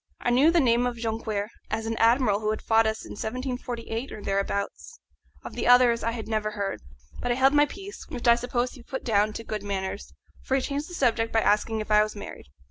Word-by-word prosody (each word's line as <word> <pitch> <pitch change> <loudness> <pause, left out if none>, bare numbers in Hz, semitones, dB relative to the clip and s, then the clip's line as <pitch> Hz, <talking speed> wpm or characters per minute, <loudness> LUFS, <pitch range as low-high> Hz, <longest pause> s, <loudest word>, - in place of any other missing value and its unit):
I 245 - 0
knew 265 +6 +5
the 340 0 +4
name 245 -3 +3
of 245 - -3
Jonquière 220 -2 -2 0.2
as 220 +1 -2
an 225 0 -2
admiral 230 -3 +3
who 215 0 -1
had 215 - -2
fought 225 0 +4
us 220 0 -3
in - - -10
1748 245 +1 -4
or 210 - -8
thereabouts; 200 - -3 0.5
of - - -7
the - - -2
others 245 -1 +6
I 230 - +1
had 225 -2 -6
never 215 -1 -1
heard. 200 -1 -3 0.4
But 245 - -1
I - - +2
held 265 +2 +4
my 295 0 +5
peace, 390 +4 -9
which 250 -6 -4
I 235 - +9
suppose 245 +1 -1
he 255 - -13
put 265 +3 -6
down 215 -2 +2
to 230 - -6
good 215 -2 -4
manners, 200 0 -4 0.3
for 265 - -1
he 270 - +2
changed 285 +4 -3
the 355 - -7
subject 230 -5 +1
by 225 - +3
asking 215 +1 +1
if 215 - -7
I 210 0 +6
was 215 0 -2
married. 200 - -9
230 Hz, 230 wpm, -26 LUFS, 215-250 Hz, 0.5 s, I